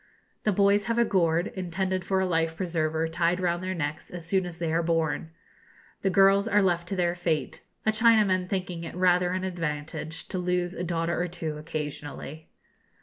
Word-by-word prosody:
The 210 - +4
boys 200 +1 +3
have 230 0 -1
a 235 - +4
gourd, 170 -2 +1
intended 185 0 -2
for 190 +1 +1
a 190 - +2
life 165 -2 0
preserver, 160 -3 0
tied 170 +2 +1
round 175 -1 0
their 185 0 -2
necks 155 -1 -4
as 175 -2 -7
soon 185 +1 +1
as 170 -2 -6
they 165 -2 -2
are 165 - +2
born. 165 -1 0 0.7
The 195 - +2
girls 195 +2 +5
are 205 -2 +3
left 175 -2 +1
to 195 - -3
their 175 -2 +1
fate, 170 -3 -2 0.2
a 220 - +4
Chinaman 215 -5 +4
thinking 180 -3 -3
it 165 - -7
rather 180 0 +3
an 185 0 -2
advantage 165 -2 -4
to 185 - -2
lose 180 0 0
a 180 - -4
daughter 170 0 -1
or 175 - 0
two 165 -3 -4
occasionally. 150 0 -6
175 Hz, 190 wpm, -27 LUFS, 165-190 Hz, 0.7 s, girls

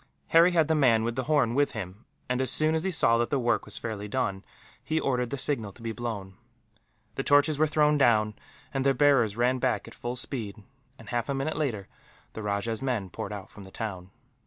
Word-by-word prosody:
Harry 165 +2 +6
had 160 -3 +3
the 160 - +2
man 125 -7 +4
with 115 +1 -2
the 130 0 -2
horn 145 -6 +2
with 145 +2 +1
him 100 0 -7 0.2
and, 125 +1 0
as 130 - 0
soon 155 +4 +3
as 160 0 0
he 190 - 0
saw 115 -10 +3
that 120 - 0
the 140 - +1
work 120 -2 0
was - - -6
fairly 105 -3 -5
done, 100 -5 -2 0.4
he 160 - 0
ordered 125 -4 0
the 140 - -3
signal 120 -7 0
to 115 - -15
be 115 - -3
blown. 110 -5 -5 0.8
The 135 - -3
torches 145 +1 +4
were 155 - +4
thrown 150 -1 +2
down, 110 -5 +3 0.4
and 135 -1 0
their 135 0 +3
bearers 125 -6 +3
ran 125 +2 +2
back 130 -1 0
at - - -11
full 120 +1 -5
speed 115 -5 -3 0.3
and, - - -13
half 120 +2 -2
a 140 - 0
minute 135 +4 -2
later, 120 -11 -2 0.5
the 110 - -6
rajah's 105 +2 -2
men 115 -9 -2
poured 100 - -6
out 100 -2 -8
from 105 - -12
the 95 - -11
town. 95 -3 -6
120 Hz, 225 wpm, -27 LUFS, 110-140 Hz, 0.8 s, Harry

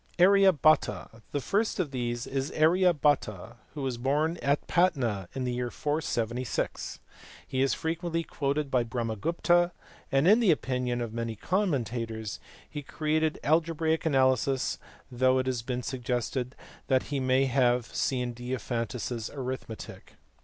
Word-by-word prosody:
Arya 195 +2 +6
Bhata. 155 -6 +1
The 145 - -1
first 210 - 0
of 160 -7 -1
these 120 -2 -2
is 135 +1 -2
Arya 175 +4 +4
Bhata, 120 - 0 0.2
who 145 - -4
was 130 -3 -2
born 150 +6 +1
at 140 +1 +1
Patna 125 - +1
in 130 - -2
the 125 -1 -1
year 125 0 -2
476. 125 -5 -2 0.5
He 130 - -1
is 135 - +2
frequently 165 +1 -2
quoted 145 -1 -2
by 125 -2 +3
Brahmagupta, 125 - +1 0.4
and 135 +4 +3
in 215 +4 +7
the 225 -5 +3
opinion 125 -5 0
of 115 -2 -4
many 115 -1 -3
commentators 115 - -2 0.3
he 150 - -6
created 155 +2 0
algebraic 160 +1 +1
analysis 130 -3 +2 0.3
though 130 +1 +3
it 130 - +1
has 130 -3 -1
been 125 +1 -3
suggested 125 +1 -2 0.3
that 130 -1 +3
he 140 - +1
may 130 +1 +3
have 125 -2 +2
seen 125 -2 -1
Diophantus 120 0 -3
s 115 -2 -3
Arithmetic. 130 -4 -7
130 Hz, 140 wpm, -28 LUFS, 120-155 Hz, 0.5 s, in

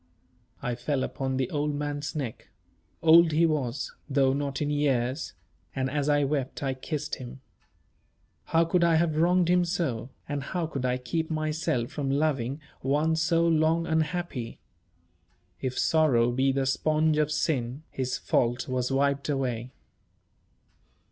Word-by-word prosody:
I 125 - -1
fell 130 +3 -1
upon 130 -1 -2
the 130 -2 0
old 150 0 -1
man's 145 +1 -3
neck 130 -7 -5 0.6
old 165 0 +7
he 165 +2 +4
was, 145 -5 -1 0.2
though 135 -1 +3
not 140 -1 -2
in 150 -1 -1
years 140 -1 0 0.4
and 130 0 -1
as 145 0 0
I 145 0 +3
wept 140 -1 -2
I 135 -1 0
kissed 150 +3 -4
him. 125 +1 -9 1.1
How 165 +1 +3
could 170 +1 +2
I 170 -1 +4
have 160 -1 +2
wronged 175 +2 +3
him 180 0 +4
so, 160 - -2 0.2
and 145 -1 -2
how 170 +5 -2
could 140 -5 -4
I 125 0 +1
keep 160 +6 -3
myself 155 -5 -1
from 140 -3 -3
loving 140 -2 0 0.2
one 150 +4 +1
so 165 +1 +2
long 165 +1 +2
unhappy? 160 -6 -2 1.0
If 130 -1 -3
sorrow 130 -7 +3
be 130 +2 +2
the 135 0 0
sponge 155 +3 +2
of 150 0 +1
sin, 135 -2 -1
his 130 -1 -2
fault 120 +1 0
was 130 0 -1
wiped 140 +1 +1
away. 125 -4 -1
145 Hz, 150 wpm, -27 LUFS, 130-160 Hz, 1.1 s, old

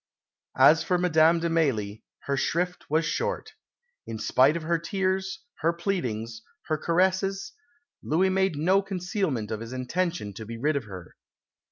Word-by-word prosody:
As 145 +5 +6
for 180 - +1
Madame 165 -1 +4
de 170 - 0
Mailly, 110 -11 0 0.2
her 140 - -1
shrift 180 +6 -1
was 160 +2 +2
short. 475 - -2 0.5
In 115 - -5
spite 135 +8 +3
of 165 - -6
her 170 +1 +1
tears, 190 +2 -2 0.2
her 160 +3 +2
pleadings, 120 - -3 0.3
her 155 - +1
caresses, 190 +3 +1 0.5
Louis 180 +5 +2
made 190 -3 +1
no 185 +7 +3
concealment 180 - -2
of 110 - -2
his 115 +2 -7
intention 130 - -2
to 110 - -8
be 115 0 -6
rid 150 +6 0
of 140 -5 -2
her. 95 -4 -10
165 Hz, 155 wpm, -26 LUFS, 130-185 Hz, 0.5 s, As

